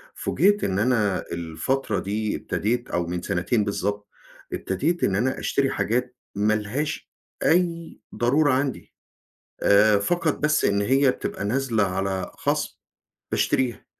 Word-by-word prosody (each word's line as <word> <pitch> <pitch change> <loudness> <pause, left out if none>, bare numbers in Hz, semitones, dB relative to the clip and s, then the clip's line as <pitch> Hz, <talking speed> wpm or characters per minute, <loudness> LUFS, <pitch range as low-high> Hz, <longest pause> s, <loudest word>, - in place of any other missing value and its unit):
فوجِئت 205 +7 +2
إن 95 0 0
أنا 105 -5 +1
الفترة 85 +8 -2
دي 105 +2 -2
ابتديت 120 +4 -2
أو 85 -1 0
من 90 0 -3
سِنتين 105 +7 0
بالضبط 100 0 -2 0.5
ابتديت 155 - -1
إن 95 - +2
أنا 130 +6 0
أشتري 135 -1 +1
حاجات 125 +2 -1 0.2
ما 105 +2 +2
لهاش 110 +8 -3 0.3
أي 170 -1 +1 0.2
ضرورة 140 +4 +3
عندي، 135 0 -2 0.7
آآ 105 +1 +5
فقط 165 +7 0
بس 150 0 +2
إن 100 0 +2
هي 135 +5 +3
بتبقى 100 - -5
نازلة 115 -1 +1
على 95 -1 -2
خَصْم - - -1 0.6
باشتريها. 125 -3 0
110 Hz, 130 wpm, -24 LUFS, 100-135 Hz, 0.7 s, آآ